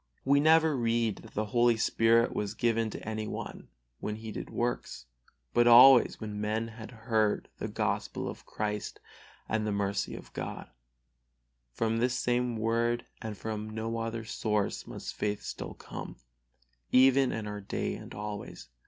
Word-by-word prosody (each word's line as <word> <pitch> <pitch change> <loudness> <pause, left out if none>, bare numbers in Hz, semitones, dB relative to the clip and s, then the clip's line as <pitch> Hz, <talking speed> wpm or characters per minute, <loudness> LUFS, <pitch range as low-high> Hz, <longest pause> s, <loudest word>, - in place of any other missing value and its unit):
We 140 +1 +5
never 160 0 +5
read 115 -3 +1
that - - -14
the 110 - 0
Holy 120 -1 +4
Spirit 115 +1 +3
was 105 +1 -3
given 115 0 +1
to 105 - -8
any 110 -1 -3
one - - -6 0.3
when 105 - -3
he 110 0 -7
did 90 -3 -6
works, 120 - -3 0.5
but 120 0 +4
always 125 +1 +8
when 105 -2 -5
men 110 +2 -1
have 110 0 -9
heard 110 -2 0
the - - -2
Gospel - - -2
of - - -7
Christ 105 -1 -4 0.5
and 110 -1 0
the - - 0
mercy 100 0 -1
of - - -11
God. - - -6 1.0
From 115 0 0
this 125 +2 +1
same 125 -1 0
Word 115 +2 0 0.2
and 110 -2 -5
from 110 -1 -4
no 110 +1 -3
other 115 0 -3
source 105 -2 -1
must - - -6
faith 105 -1 -2
still - - -6
come, - - -8 0.8
even 130 +1 +5
in 110 -1 -3
our 105 0 -5
day 100 - -2
and - - -9
always. 105 0 -6
110 Hz, 160 wpm, -30 LUFS, 105-120 Hz, 1.0 s, always